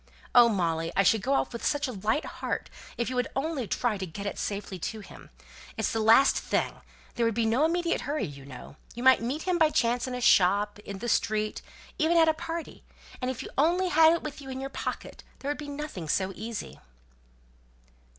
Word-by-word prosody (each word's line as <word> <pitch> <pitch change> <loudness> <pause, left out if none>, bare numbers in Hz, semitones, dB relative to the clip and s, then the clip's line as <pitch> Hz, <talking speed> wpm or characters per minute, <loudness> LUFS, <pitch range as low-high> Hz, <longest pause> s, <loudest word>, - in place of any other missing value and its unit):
Oh, 240 -1 +8
Molly, 165 -5 0
I 195 - +4
should 220 +2 +3
go 265 +7 0
off - - 0
with 235 - -6
such 290 0 +1
a - - -4
light 220 +7 -1
heart - - -4 0.3
if 235 - -1
you 255 - -3
would 250 - 0
only 275 -3 -2
try 220 -2 -1
to 190 - -3
get 200 +5 -7
it 200 - -4
safely 200 -2 -4
to 220 +5 -4
him. 195 - -13 0.5
It's - - 0
the 225 - 0
last 225 +5 +6
thing; - - -1 0.3
there 235 - -1
would 230 - -1
be 230 -1 +1
no 235 +7 +3
immediate 340 +1 0
hurry, 295 +1 -2
you 140 -2 -9
know. 135 +1 -11 0.2
You 240 - -5
might 260 -2 +6
meet 265 +7 -3
him 365 -2 0
by 315 -1 +5
chance 245 -2 +1
in 255 - -4
a - - -3
shop, 205 -1 +4
in 200 -1 -8
the 235 +5 -5
street, 215 -2 0 0.4
even 325 +2 +3
at 325 -1 +6
a 315 - +4
party 330 +1 -6 0.4
and 255 - -1
if 260 - -4
you - - -8
only 355 +5 +3
had 320 -1 +6
it 335 - -2
with 300 -1 -6
you 270 - -9
in 260 0 -5
your 270 +1 -5
pocket, - - -5
there 280 - -3
would 295 - -5
be 295 -1 -6
nothing 285 - -6
so 190 +3 0
easy." 220 +2 -6
240 Hz, 220 wpm, -28 LUFS, 205-295 Hz, 0.5 s, Oh